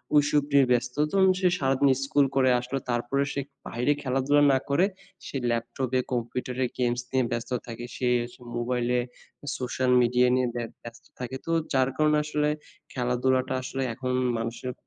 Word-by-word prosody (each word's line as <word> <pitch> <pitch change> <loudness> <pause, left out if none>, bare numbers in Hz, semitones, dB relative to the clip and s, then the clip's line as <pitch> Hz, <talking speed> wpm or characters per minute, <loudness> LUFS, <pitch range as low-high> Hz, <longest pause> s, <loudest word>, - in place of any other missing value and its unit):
ওইসব 145 0 +4
নিয়ে 140 -2 +6
ব্যস্ত। 125 +1 +1 0.2
ধরুন 190 -1 +5
সে 185 - +3
সারাদিন 135 0 +3
school 140 0 +3
করে 130 -1 +4
আসলো 125 +3 -3
তারপরে 120 +4 0
সে 140 - -1 0.3
বাইরে 125 +5 0
খেলাধুলা 135 +2 +2
না - - +4
করে 150 +7 +4 0.4
সে 135 - -4
laptop 120 +2 -2
এ - - +3
computer 125 +1 -3
এ - - 0
games 120 0 +1
নিয়ে 130 -2 +2
ব্যস্ত 120 +1 -3 0.2
থাকে। 120 +1 -6
সে 125 -1 0 0.2
স - - -14 0.2
mobile 120 0 -1
এ - - +1 0.6
social 125 0 -1
media 125 +1 +3
নিয়ে 130 -1 +2
ব্যা 120 -1 -2 0.2
ব্যস্ত 120 0 -11
থাকে। 125 +1 -5
তো 165 - -2 0.2
যার 130 0 +3
কারণে 150 0 +3
আসলে 150 0 0 0.4
খেলাধুলাটা 130 +1 +1
আসলে 135 +1 -4
এখন 130 +1 -3 0.3
মানুষের 115 +2 -4
130 Hz, 170 wpm, -27 LUFS, 120-140 Hz, 0.6 s, নিয়ে